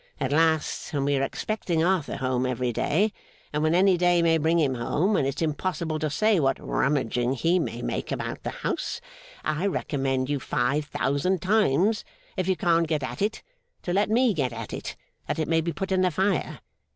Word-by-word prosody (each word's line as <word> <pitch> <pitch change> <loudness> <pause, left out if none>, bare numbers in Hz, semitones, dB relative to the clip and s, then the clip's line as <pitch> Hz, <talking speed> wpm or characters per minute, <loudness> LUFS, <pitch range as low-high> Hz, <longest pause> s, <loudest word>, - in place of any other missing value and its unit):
At 135 - -1
last, 160 +2 +1
when 140 -2 0
we 145 0 +2
are 135 - +1
expecting 170 +3 -1
Arthur 180 -4 +1
home 130 -1 0
every 125 -1 -1
day, 200 - +1 0.4
and 150 - 0
when 155 +2 +2
any 185 0 +4
day 175 -1 +3
may 165 -1 +3
bring 160 +2 +2
him 145 -5 +2
home, 155 - 0
and 135 - +2
it's 140 +4 -2
impossible 160 0 -2
to 155 - -1
say 210 +6 +2
what 135 -2 +2
rummaging 125 -3 0
he 165 +7 +2
may 120 -7 -3
make - - -3
about - - -4
the - - -3
house, - - -3 0.5
I 155 +5 0
recommend 135 -7 -1
you 145 0 -1
five 135 +4 0
thousand 150 +6 0
times, 205 0 +2 0.3
if 185 -1 -1
you 190 - +2
can't 165 -1 +2
get 155 -3 -1
at 125 +4 -5
it, 210 +2 -1 0.4
to 175 - -2
let 205 +3 +2
me 235 +1 +3
get 135 -7 -1
at 115 -2 -7
it, - - -5 0.3
that - - -2
it 155 - -1
may 165 0 +2
be 170 +1 -2
put 190 +6 -4
in 185 -1 +3
the 185 - +3
fire. 190 +1 -1
160 Hz, 200 wpm, -26 LUFS, 135-185 Hz, 0.5 s, any